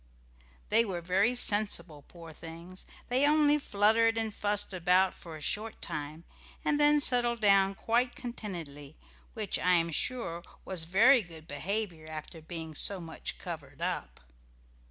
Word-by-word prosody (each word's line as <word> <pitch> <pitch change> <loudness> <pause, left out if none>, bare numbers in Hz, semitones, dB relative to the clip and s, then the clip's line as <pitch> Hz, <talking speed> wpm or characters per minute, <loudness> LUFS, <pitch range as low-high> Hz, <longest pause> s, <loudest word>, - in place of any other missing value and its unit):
They 230 - +4
were 190 -6 -4
very 190 +8 +2
sensible, 205 -9 +1
poor 165 -2 -12
things, 170 +3 -10 0.2
they 260 +4 +3
only 300 0 +4
fluttered 225 -1 +3
and 220 -1 -1
fussed 205 -1 -1
about 185 +1 +3
for 165 -2 -10
a - - -13
short 215 +8 -2
time, 155 0 -5 0.4
and 295 - +1
then 295 0 +5
settled 240 -3 +2
down 195 -2 +4
quite 240 +4 0
contentedly, 165 - -8 0.4
which, 215 -3 -1
I 180 0 +3
am 165 -1 +1
sure, 175 - -1 0.2
was 180 -4 0
very 230 +9 +5
good 165 -4 -12
behaviour 175 +1 -3
after 155 +1 -8
being 160 0 -5
so 195 +5 0
much 165 -2 -5
covered 150 -5 -7
up. 175 +1 -3
190 Hz, 145 wpm, -30 LUFS, 165-225 Hz, 0.4 s, then